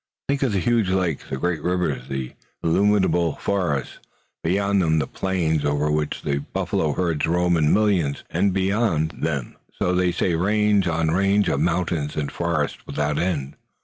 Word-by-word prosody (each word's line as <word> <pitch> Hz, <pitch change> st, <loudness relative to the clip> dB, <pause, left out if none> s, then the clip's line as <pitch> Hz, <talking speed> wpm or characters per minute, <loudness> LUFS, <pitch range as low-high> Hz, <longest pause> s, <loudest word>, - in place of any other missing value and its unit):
Think 140 Hz, 0 st, +1 dB
of 135 Hz, -4 st, +1 dB
the -, -, +1 dB
huge 115 Hz, -1 st, +1 dB
lakes, 90 Hz, -5 st, 0 dB
the 65 Hz, -, -3 dB
great 85 Hz, +1 st, -1 dB
rivers, 90 Hz, -7 st, -1 dB
the 65 Hz, -2 st, -4 dB, 0.3 s
illimitable 90 Hz, -2 st, +2 dB
forests, 90 Hz, -9 st, -2 dB, 0.4 s
beyond 100 Hz, +3 st, +1 dB
them 80 Hz, -2 st, +2 dB
the 75 Hz, -, +1 dB
plains 85 Hz, -5 st, -1 dB
over 75 Hz, +1 st, +1 dB
which 75 Hz, -1 st, -1 dB
the 70 Hz, -1 st, 0 dB
buffalo 75 Hz, -2 st, 0 dB
herds 85 Hz, -3 st, 0 dB
roam 90 Hz, +1 st, +2 dB
in 75 Hz, -2 st, +3 dB
millions, 95 Hz, -10 st, +1 dB
and 100 Hz, -, +2 dB
beyond 95 Hz, -4 st, +1 dB
them, 70 Hz, -6 st, -3 dB, 0.2 s
so 90 Hz, -, +1 dB
they 90 Hz, 0 st, +2 dB
say, 85 Hz, -, 0 dB
range 105 Hz, +2 st, +2 dB
on 80 Hz, -1 st, +1 dB
range 100 Hz, +3 st, +2 dB
of 70 Hz, -, 0 dB
mountains 85 Hz, -2 st, 0 dB
and 75 Hz, -2 st, -2 dB
forests 85 Hz, -4 st, -1 dB
without 75 Hz, 0 st, -1 dB
end." 75 Hz, -6 st, -2 dB
85 Hz, 165 wpm, -23 LUFS, 75-95 Hz, 0.4 s, in